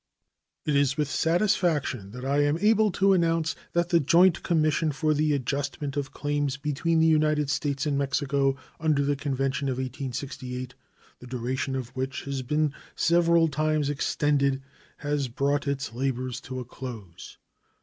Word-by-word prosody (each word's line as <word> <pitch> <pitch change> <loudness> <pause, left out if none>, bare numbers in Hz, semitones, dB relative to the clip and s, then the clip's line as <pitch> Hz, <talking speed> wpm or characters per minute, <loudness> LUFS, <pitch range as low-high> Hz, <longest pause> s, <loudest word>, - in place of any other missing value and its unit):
It 150 - +1
is 140 0 +2
with 150 -1 +1
satisfaction 160 - +1
that 125 +4 -8
I 140 +2 +1
am 145 +2 +2
able 215 +2 +3
to 195 +2 +4
announce 165 -3 +1 0.2
that 170 0 +1
the 170 -2 +4
joint 170 +4 +4
commission 155 -2 +1
for 155 +2 +1
the 150 +1 +1
adjustment 140 +1 -2
of 145 -1 -3
claims 145 -2 -1
between 150 +3 0
the 160 - +4
United 155 -2 +3
States 140 -1 -1
and 140 -2 0
Mexico 140 0 +1 0.2
under 155 -3 +2
the 145 0 +1
convention 135 -1 -1
of 130 - -1
1868, 130 -1 -5 0.5
the 125 - -11
duration 130 +2 -2
of 130 -3 -4
which 130 +1 -3
has 140 -1 -3
been 150 +3 0 0.2
several 170 0 +4
times 155 0 0
extended, 140 -2 +1 0.3
has 145 -2 -1
brought 140 +4 0
its 135 -5 -2
labors 130 0 -2
to 130 0 -6
a 125 - -6
close. 115 -8 -9
145 Hz, 155 wpm, -27 LUFS, 135-155 Hz, 0.5 s, to